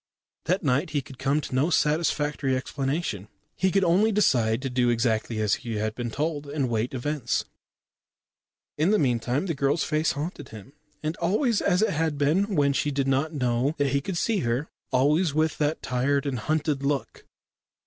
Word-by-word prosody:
That 180 +4 0
night 140 +4 +1
he 145 -3 -1
could 135 -1 -13
come 140 +3 +1
to 140 - -7
no 135 +6 +2
satisfactory 150 -4 +1
explanation. 135 - -3 0.3
He 190 - +1
could 195 +1 +2
only 190 +6 +3
decide 120 - +2
to 135 - -1
do 125 -1 +2
exactly 115 -1 0
as 105 -1 +1
he 115 -2 -4
had 110 +1 -1
been 120 +1 -4
told, 150 +3 -2
and 140 -1 -1
await 120 +1 -1
events. 130 -1 -1 1.3
In 160 +4 +3
the 215 - +4
meantime 125 - 0
the 170 - -1
girl's 140 +3 +1
face 155 0 +1
haunted 145 -1 -5
him, 110 +5 -11 0.3
and 155 +2 -2
always 210 - +1
as 190 +1 +2
it - - +2
had 160 -1 -1
been 180 +8 +1
when 140 -2 +3
she 145 - 0
did 135 -1 -1
not 135 +4 +1
know 125 +2 0
that 145 -1 +1
he 140 - +1
could 175 +4 -4
see 220 +3 +1
her 120 +3 -1 0.2
always 145 +5 +2
with 155 -1 +1
that 150 +1 0
tired 135 +2 0
and 135 -4 -2
hunted 150 +2 -1
look. 140 0 -3
145 Hz, 185 wpm, -26 LUFS, 125-160 Hz, 1.3 s, the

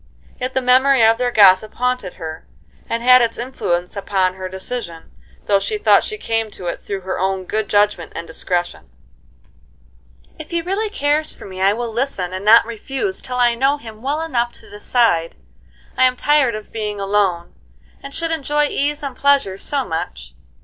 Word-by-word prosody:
Yet 255 +1 -4
the 260 - +1
memory 255 -1 +5
of 225 +1 +4
their 250 -1 +1
gossip 205 -2 +5
haunted 250 -7 -2
her, 160 0 -8 0.4
and 230 +1 -2
had 250 0 +7
its 230 -1 0
influence 180 -8 -3
upon 195 -2 0
her 185 0 -6
decision, 190 -3 -7 0.3
though 200 -1 +3
she 425 - -2
thought 420 - +4
she 430 - -4
came 225 - -2
to 185 - -9
it 170 - -4
through 200 -1 -5
her 185 0 -4
own 190 0 -1
good 215 +3 -2
judgment 205 -4 +1
and 170 - -5
discretion. 175 - -3 1.5
"If 310 - -9
he 340 - -1
really 400 +5 -2
cares 300 -4 0
for - - -13
me 185 -1 -8
I 195 +1 +4
will 235 0 -4
listen, 220 -8 -2
and 185 +1 -5
not 225 +3 +7
refuse 270 - -4
till 250 -1 -5
I 240 -1 +4
know 270 +4 +1
him 220 -5 -12
well 285 +5 -1
enough 240 -7 -1
to - - -15
decide. 205 -5 +1 0.6
I'm 255 0 +3
tired 290 -6 +3
of 215 - -9
being 210 -2 -4
alone, 195 -4 0 0.5
and 275 0 -9
should 330 0 -1
enjoy 295 -1 0
ease 290 +1 -1
and 275 -3 -5
pleasure 275 -10 +2
so 275 +2 -2
much. - - -5
230 Hz, 180 wpm, -19 LUFS, 190-270 Hz, 1.5 s, had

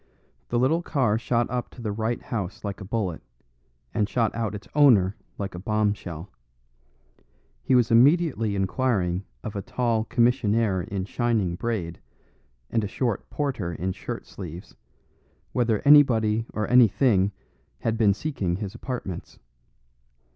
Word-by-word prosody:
The 120 - 0
little 140 +8 +2
car 125 -10 +1
shot 120 0 0
up 125 -1 -2
to 125 - -12
the 105 - -1
right 110 +3 -1
house 100 -2 -5
like 100 0 -5
a - - -5
bullet, 95 -4 -2 0.7
and 105 -1 0
shot 115 -3 +1
out 110 -3 -2
its 105 - -9
owner 110 -10 +5 0.2
like 100 -1 -4
a 90 - -6
bomb 105 +1 +1
shell. 85 -2 -8 1.3
He 130 - +2
was 120 -2 +3
immediately 125 - +4
inquiring 95 -3 0 0.2
of 110 - -6
a 100 - -2
tall 115 +1 0
commissionaire 115 -5 +2
in 95 +1 -4
shining 110 -5 0
braid, 90 -4 -3 0.7
and 115 -2 +1
a - - -1
short 115 0 -2
porter 125 - -2
in 90 +3 -2
shirt - - -6
sleeves, 90 -2 -9 0.8
whether 115 -4 +1
anybody 115 -6 +5
or 105 - -2
anything 115 -4 +4 0.5
had 115 -1 0
been 105 -4 +3
seeking 100 - -2
his 100 0 -5
apartments. 120 -7 -6
110 Hz, 140 wpm, -25 LUFS, 100-120 Hz, 1.3 s, owner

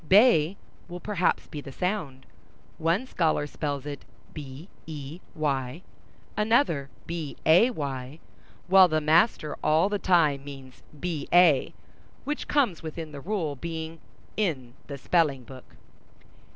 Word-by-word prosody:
"Bay" 195 -4 +5 0.3
will 175 0 -7
perhaps 185 -2 0
be 150 - -7
the 135 - -9
sound; 155 -7 -3 0.5
one 170 +9 +1
scholar 160 - 0
spells 145 -2 -4
it 145 -2 -6 0.3
"bey," 145 +2 -9 1.7
another, 210 - +2 0.2
"bay," 165 - +2
while 155 - 0
the 155 -2 +1
master 155 0 +2
all 160 +6 +3
the 205 -1 -1
time 155 -7 +3
means 135 -2 -11
"ba," 160 -1 +3 0.6
which 295 +1 -4
comes 250 - +1
within 160 -1 -6
the 140 -1 -8
rule, 170 -5 -2
being 160 +2 -6 0.4
in 140 - -2
the 140 - -6
spelling 145 -3 +1
book. 130 +1 -13
160 Hz, 110 wpm, -27 LUFS, 140-185 Hz, 1.7 s, Bay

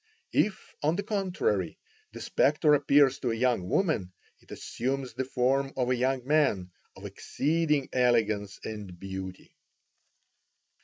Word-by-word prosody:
If, 205 -2 0
on 155 +2 +2
the 200 - -2
contrary, 200 - -1 0.3
the - - -9
spectre 150 -2 +3
appears 140 -2 +4
to 125 - -1
a 115 - 0
young 115 -6 0
woman, 130 - 0 0.3
it - - -26
assumes 130 +1 -4
the 130 - -3
form 135 +2 0
of 125 -1 +1
a - - +3
young 130 0 0
man 135 -12 +2 0.2
of - - -11
exceeding 150 -2 0
elegance 110 -5 +1
and 100 -5 -7
beauty." 95 -1 -7
130 Hz, 135 wpm, -28 LUFS, 110-150 Hz, 0.3 s, appears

